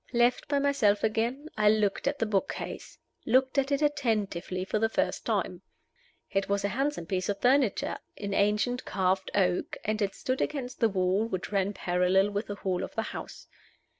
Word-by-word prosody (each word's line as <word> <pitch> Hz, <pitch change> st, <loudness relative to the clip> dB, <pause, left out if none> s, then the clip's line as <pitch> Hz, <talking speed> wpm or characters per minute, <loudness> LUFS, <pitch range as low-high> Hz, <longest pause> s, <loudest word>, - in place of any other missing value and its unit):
Left 240 Hz, +1 st, +2 dB
by 285 Hz, -, +1 dB
myself 275 Hz, -8 st, +2 dB
again, 235 Hz, +7 st, 0 dB
I 210 Hz, -1 st, +4 dB
looked 210 Hz, +3 st, +1 dB
at 285 Hz, +1 st, 0 dB
the 225 Hz, -, 0 dB
book 205 Hz, -3 st, 0 dB
case -, -, -7 dB, 0.3 s
looked 260 Hz, +3 st, +3 dB
at 275 Hz, +1 st, -1 dB
it 280 Hz, +2 st, +1 dB
attentively 215 Hz, -, 0 dB
for 215 Hz, -, -1 dB
the 225 Hz, +1 st, +2 dB
first -, -, -1 dB
time. -, -, -1 dB, 0.7 s
It 195 Hz, 0 st, 0 dB
was 200 Hz, 0 st, +1 dB
a -, -, +1 dB
handsome 275 Hz, -, -1 dB
piece 185 Hz, +2 st, -2 dB
of 200 Hz, -, -1 dB
furniture 255 Hz, -3 st, +2 dB, 0.2 s
in 200 Hz, -1 st, -4 dB
ancient 210 Hz, +5 st, +1 dB
carved 190 Hz, 0 st, 0 dB
oak, 180 Hz, -3 st, +1 dB
and 215 Hz, +1 st, -1 dB
it 200 Hz, -1 st, 0 dB
stood 255 Hz, 0 st, -2 dB
against 255 Hz, -4 st, -3 dB
the 230 Hz, -, +4 dB
wall 190 Hz, +2 st, +1 dB
which 185 Hz, -3 st, -4 dB
ran 200 Hz, 0 st, +1 dB
parallel 185 Hz, +2 st, +2 dB
with 205 Hz, +2 st, -2 dB
the 205 Hz, -, -4 dB
hall 190 Hz, -2 st, -2 dB
of -, -, -7 dB
the 225 Hz, -, 0 dB
house. -, -, -8 dB
210 Hz, 190 wpm, -29 LUFS, 195-250 Hz, 0.7 s, I